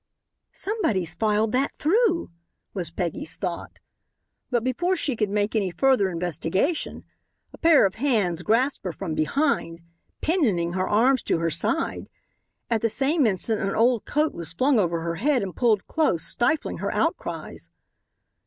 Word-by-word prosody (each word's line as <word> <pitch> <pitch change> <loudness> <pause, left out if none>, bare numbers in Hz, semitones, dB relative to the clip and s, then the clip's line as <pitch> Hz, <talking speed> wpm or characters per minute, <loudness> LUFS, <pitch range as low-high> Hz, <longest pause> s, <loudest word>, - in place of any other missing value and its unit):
"Somebody's 235 - -1
filed 210 +3 +1
that 265 +2 0
through," 355 - +1 0.4
was 180 -5 -3
Peggy's 165 -2 -4
thought. 180 -3 -5 0.7
But 240 -3 0
before 345 +9 0
she 290 -7 0
could 210 -2 0
make 205 +2 -1
any 200 -4 +1
further 250 0 +2
investigation 180 - -2 0.5
a - - -13
pair 325 -7 +6
of 190 - 0
hands 205 - +1
grasped 250 +8 +1
her 180 - -2
from 175 -3 -5
behind, 165 - 0 0.4
pinioning 215 - +1
her 185 0 -1
arms 245 +4 +3
to - - +1
her 165 0 -1
side. 180 - -1 0.6
At 230 -2 0
the 230 - +1
same 275 +5 +2
instant 215 +2 -1
an 195 - -1
old 235 0 +2
coat 300 +1 0
was 165 -1 -6
flung 255 +6 +2
over 170 -4 0
her 165 0 -3
head 265 - +1
and 190 -2 -6
pulled 225 -5 +2
close, 300 - 0
stifling 255 +6 0
her - - -2
outcries. - - -3
220 Hz, 155 wpm, -24 LUFS, 180-275 Hz, 0.7 s, pair